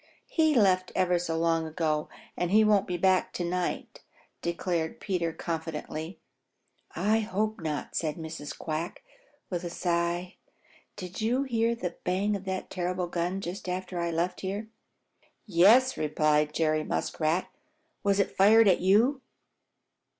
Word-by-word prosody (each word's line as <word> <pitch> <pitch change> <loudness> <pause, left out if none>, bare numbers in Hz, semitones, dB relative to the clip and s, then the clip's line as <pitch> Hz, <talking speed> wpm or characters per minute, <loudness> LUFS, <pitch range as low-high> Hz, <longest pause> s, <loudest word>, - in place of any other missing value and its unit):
"He 315 -2 +2
left 185 -5 +3
ever 180 -1 +2
so 165 -2 -2
long 165 -1 +1
ago, 155 -2 -1 0.3
and 175 - -1
he 215 +3 +5
won't 210 -2 +3
be 180 - -2
back 185 +1 +2
to 175 - -2
night," 180 +1 -3 0.4
declared 170 -1 -2
Peter 175 -4 -1
confidently. 160 0 -5 0.8
"I 210 +6 +2
hope 215 -1 -2
not," 155 -3 -4
said 155 -3 -1
Mrs. 160 -2 -7
Quack, 160 +2 -4 0.5
with 175 -1 -2
a 175 - -3
sigh. 175 +1 -1 0.6
"Did 185 0 -7
you 245 +5 +1
hear 235 -3 +1
the 180 -6 -5
bang 195 +3 +1
of 195 -1 -6
that 190 0 -4
terrible 180 0 -1
gun 175 +2 -2
just 180 +1 -5
after 180 0 -3
I 170 0 0
left 170 +2 -1
here?" 200 +3 -4 0.8
"Yes," 220 +7 +5
replied 150 0 +1
Jerry 155 -1 +1
Muskrat. 160 +4 -1 0.5
"Was 200 0 +2
it 200 - 0
fired 215 +3 +6
at 185 - +5
you?" 225 +9 +3
180 Hz, 145 wpm, -28 LUFS, 165-200 Hz, 0.8 s, fired